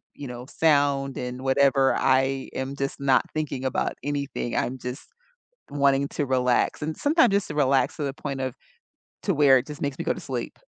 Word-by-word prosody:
you 145 -2 -7
know, 125 0 -7
sound, 140 -3 +2
and 125 +1 -5
whatever, 135 0 +3
I 135 +1 +1
am 135 +1 -3
just 135 0 -3
not 135 -2 +3
thinking 145 -4 -3
about 130 - -1
anything, 140 -4 -3
I'm 130 +2 -1
just 125 +3 -7 0.6
wanting 140 -1 +2
to 145 - -2
relax, 125 +1 +1
and 155 +1 -3
sometimes 290 - +3
just 200 -1 +1
to 150 - -5
relax, 135 -2 +2
to 150 - -3
the 135 -1 -3
point 140 -2 -5
of 130 -2 -3 0.7
to 195 - +2
where, 140 -3 +6
it 125 - -5
just 150 -2 -9
makes 140 -1 -2
me - - -3
go - - +1
to - - -8
sleep. - - -5
135 Hz, 195 wpm, -25 LUFS, 130-145 Hz, 0.7 s, where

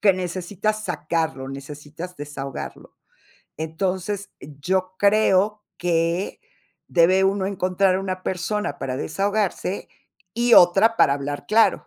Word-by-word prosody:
que 200 -2 +5
necesitas 185 +4 -3
sacarlo, 160 -6 -2
necesitas 150 +5 -8
desahogarlo. 140 -2 -7 0.6
Entonces, 185 +5 -3
yo 185 +6 -2
creo 205 0 +3 0.2
que 170 +1 0 0.5
debe 180 +2 +4
uno 195 0 +1
encontrar 185 0 +1
una 185 -1 -4
persona 185 -3 -2
para 130 -1 -3
desahogarse 200 +3 -1 0.5
y 235 +1 +4
otra 195 +6 +6
para 140 - +5
hablar 145 0 -5
claro. 225 +1 +3
185 Hz, 105 wpm, -23 LUFS, 160-200 Hz, 0.6 s, otra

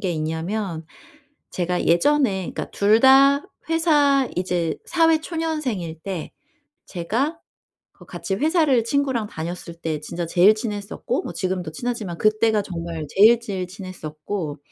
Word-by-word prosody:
게 190 -5 -1
있냐면 165 +2 -3 0.7
제가 180 0 -1
예전에 190 - +2
그러니까 - - -5
2 210 +2 +4
다 275 +2 +6 0.3
회사 295 -5 +3
이제 175 -3 -1
사회 325 -2 +3
초년생일 300 - -3
때 185 -5 -5 0.6
제가 255 - -2 0.5
그 - - -17
같이 195 - -4
회사를 300 - +2
친구랑 265 -3 0
다녔을 170 0 -6
때 155 -2 -2
진짜 170 +3 -4
제일 180 +5 +5
친했었고 215 - -3
뭐 - - -6
지금도 185 -4 -3
친하지만 215 -3 -4
그때가 215 0 +3
정말 165 -4 -5
제일, 225 +4 +6
제일 190 -5 -4
친했었고 175 -3 -6
205 Hz, 280 characters per minute, -22 LUFS, 170-265 Hz, 0.7 s, 다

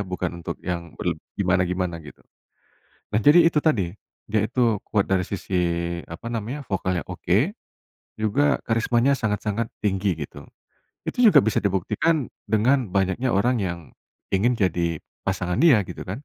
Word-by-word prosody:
bukan 90 -2 -3
untuk 85 - -5
yang 85 -3 -4
berleb 85 -3 -2 0.2
gimana-gimana 90 -2 0
gitu. 75 - -13 0.9
Nah - - +4
jadi 155 +7 +7
itu 160 -2 +3
tadi, 105 - +1 0.4
dia 110 0 +2
itu, 115 -2 +1
kuat 100 -3 +2
dari 95 -1 +3
sisi, 100 -1 -5 0.5
apa 85 +7 -9
namanya, 120 +5 -4
vokalnya 95 -3 -1
oke, 95 - +1 0.7
juga, 140 +7 +2
karismanya 120 +3 +2
sangat-sangat 110 -1 -1 0.2
tinggi 95 -3 +1
gitu. 70 - -11 0.6
Itu - - -2
juga - - +7
bisa 110 - +1
dibuktikan, 105 - 0 0.2
dengan, 120 +3 +2
banyaknya 95 +6 0
orang 120 +4 +2
yang, 90 -3 -2 0.5
ingin 115 +6 +2
jadi 85 -5 0 0.3
pasangan 95 -2 -1
dia 135 -12 +6
gitu - - -8
kan? 110 +10 -5
100 Hz, 140 wpm, -24 LUFS, 90-120 Hz, 0.9 s, jadi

